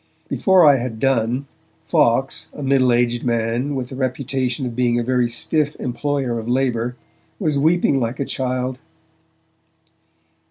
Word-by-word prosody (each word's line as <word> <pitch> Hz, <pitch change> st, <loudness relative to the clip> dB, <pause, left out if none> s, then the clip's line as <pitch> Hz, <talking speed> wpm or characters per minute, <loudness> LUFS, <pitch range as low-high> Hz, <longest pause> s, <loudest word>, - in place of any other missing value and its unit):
Before 190 Hz, -3 st, +4 dB
I 145 Hz, -2 st, +7 dB
had 120 Hz, -3 st, -4 dB
done, 125 Hz, +1 st, +1 dB, 0.4 s
Fawkes, -, -, +1 dB
a 145 Hz, -, -6 dB
middle 135 Hz, -2 st, +3 dB
aged 120 Hz, 0 st, +1 dB
man 120 Hz, +4 st, -1 dB
with 125 Hz, -2 st, -4 dB
the 130 Hz, -, -8 dB
reputation 130 Hz, 0 st, -2 dB
of 120 Hz, -2 st, -5 dB
being 120 Hz, -1 st, +1 dB
a -, -, -1 dB
very 125 Hz, -1 st, +1 dB
stiff 150 Hz, +5 st, -1 dB
employer 125 Hz, -1 st, -2 dB
of 115 Hz, +1 st, -6 dB
labour, 125 Hz, -2 st, 0 dB, 0.4 s
was 155 Hz, -8 st, 0 dB
weeping 160 Hz, -2 st, +3 dB
like 120 Hz, 0 st, -3 dB
a 140 Hz, -, -1 dB
child. 130 Hz, 0 st, -2 dB
130 Hz, 145 wpm, -20 LUFS, 120-140 Hz, 0.4 s, I